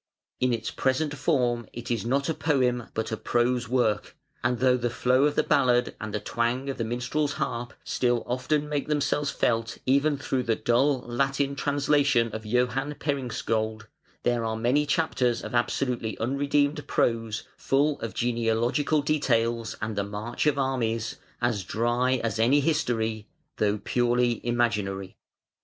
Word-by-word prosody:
In 125 0 +2
its 115 -2 -2
present 145 +3 0
form 120 -7 +1
it 120 +1 -6
is 115 -1 -1
not 140 +3 +1
a 160 - +1
poem 125 -7 +1
but 110 0 -2
a 110 - -1
prose 120 +1 0
work, 120 -4 0 0.3
and 120 +1 +1
though 130 +1 +4
the 120 -1 -1
flow 125 +3 +2
of 150 - +1
the - - +3
ballad 125 -3 +2
and 110 0 -4
the 105 - -2
twang 120 +6 -1
of 135 - -9
the - - +1
minstrel's 130 +6 -1
harp 120 -2 -3
still 120 -2 0
often 130 +5 0
make 145 -1 -2
themselves 145 -1 0
felt 115 -3 0
even 140 +3 +3
through 135 -2 -1
the 115 -2 0
dull 130 +4 +2
Latin 135 +3 0
translation 140 -4 +2
of 110 0 -6
Johan 125 +5 0
Peringskiold, 115 -6 -2 0.4
there 120 -1 +1
are 110 0 -1
many 130 +6 +2
chapters 135 -6 +1
of - - -6
absolutely 120 -1 0
unredeemed 145 +4 0
prose, 115 -2 0
full 140 +2 +1
of 115 - -5
genealogical 120 +5 +1
details 115 -6 +1
and 110 0 -2
the 100 - 0
marches 105 +8 -1
of 140 - -2
armies, 115 -4 -1 0.3
as 115 -5 +1
dry 120 +6 +1
as 115 -1 -1
any 125 +6 +4
history, 115 -8 0 0.3
though 105 0 +1
purely 120 +1 +1
imaginary. 105 -6 -1
120 Hz, 155 wpm, -27 LUFS, 115-140 Hz, 0.4 s, though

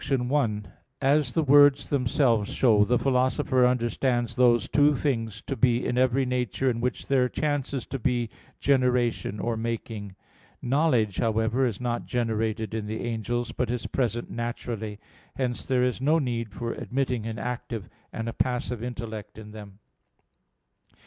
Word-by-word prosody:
1: 125 -6 0 0.3
As 140 -2 +2
the 160 - +3
words 145 0 +5
themselves 125 -5 +2
show, 110 -5 +4
the 120 +4 +2
Philosopher 130 0 +2
understands 120 0 0
those 120 -2 +4
two 145 0 +4
things 115 -7 -2
to 135 - -3
be 120 0 +2
in - - -1
every 130 +1 +2
nature 125 -1 0
in 115 -1 -4
which 125 0 -2
there 130 -2 +3
chances 140 -4 -2
to 135 - -5
be 120 0 0 0.3
generation 125 -6 +1
or 115 +3 -1
making. 110 -3 -4 0.4
Knowledge, 125 - +1
however, 115 +3 +1
is 110 -5 -4
not 120 -1 -2
generated 110 -2 -1
in 110 -2 -3
the 110 +1 -4
angels, 120 +1 -2
but 125 - -2
is 120 -1 -2
present 120 -2 -2
naturally. 115 -2 -4 0.4
Hence 125 -2 -2
there 130 -2 +2
is 125 0 0
no 150 +4 +3
need 120 -7 -2
for 115 +3 -4
admitting 125 -3 -2
an 110 -1 -4
active 120 -3 -4 0.2
and 115 0 -4
a 115 - -3
passive 125 -2 -1
intellect 115 -4 -6
in 105 -1 -10
them. 105 -2 -11
120 Hz, 150 wpm, -26 LUFS, 115-130 Hz, 0.4 s, words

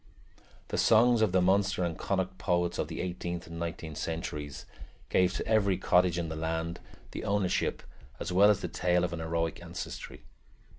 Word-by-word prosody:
The - - -1
songs 115 +1 +5
of 110 -4 +3
the 95 -1 +3
Munster 95 0 +2
and 85 -2 -1
Connacht 95 0 -2
poets 85 -1 0
of - - 0
the - - -5
eighteenth 85 -1 -4
and 85 0 -8
nineteenth 80 -2 -5
centuries 75 -4 -4 0.4
gave 90 0 +3
to - - -3
every 100 -4 +2
cottage 90 -1 +3
in 85 -1 -1
the 80 - -4
land 80 +1 -2 0.3
the - - -5
ownership 100 -2 0 0.4
as 85 - -4
well 100 +3 +6
as 105 -1 +3
the - - -2
tale 90 0 +1
of 85 -1 -1
an 85 - -4
heroic 80 0 -2
ancestry. - - -7
90 Hz, 180 wpm, -30 LUFS, 80-95 Hz, 0.4 s, well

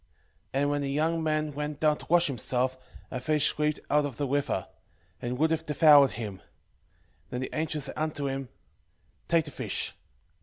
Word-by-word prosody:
6:2 - - -37 0.5
And 140 +2 +2
when 145 0 0
the 140 - -2
young 160 +4 +1
man 155 -1 0
went 150 0 -4
down 155 -1 +3
to - - -10
wash 175 +1 +5
himself, 130 0 0 0.4
a 130 - -3
fish 150 +3 +2
leaped 150 0 +1
out 150 0 +4
of 140 -5 -4
the 145 - 0
river, 145 +2 -1 0.5
and 125 +1 -3
would 160 +3 +2
have 160 0 0
devoured 150 -2 +7
him. 105 -5 -5
6:3 - - -25 0.9
Then 125 - -3
the 130 - -4
angel 155 -1 -1
said 135 - -4
unto 155 -2 -2
him, 135 -1 -4 0.8
Take 165 -2 +3
the 150 - -6
fish. - - -2
145 Hz, 190 wpm, -28 LUFS, 135-155 Hz, 0.9 s, devoured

